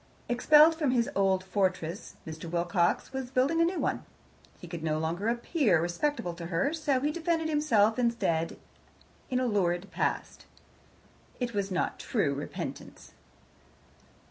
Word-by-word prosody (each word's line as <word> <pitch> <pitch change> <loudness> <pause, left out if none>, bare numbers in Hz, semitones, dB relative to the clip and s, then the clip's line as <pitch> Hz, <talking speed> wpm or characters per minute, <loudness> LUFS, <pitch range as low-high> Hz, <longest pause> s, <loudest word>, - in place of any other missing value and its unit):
Expelled 300 +6 +6
from 315 -4 0
his 240 -2 +1
old 190 -1 +2
fortress, 185 -3 -2
Mr. 160 +1 -7
Wilcox 175 +7 0
was 265 -2 -4
building 270 +6 +2
a - - +5
new 355 +2 -1
one. - - -1 0.6
He - - -10
could 170 -3 -6
no 155 -1 0
longer 165 +6 -2
appear 235 - +2
respectable 175 - -1
to 170 0 -7
her, 180 - 0
so 295 -5 +1
he 295 +2 +1
defended 325 0 -1
himself 235 -8 +3
instead 200 -9 0 0.7
in 255 -2 +1
a 255 - 0
lurid 190 -4 0
past. - - -3 0.9
It 245 -2 -2
was 200 -1 -1
not 180 -2 -1
true 180 - 0
repentance. 140 +2 -7
210 Hz, 145 wpm, -29 LUFS, 175-280 Hz, 0.9 s, Expelled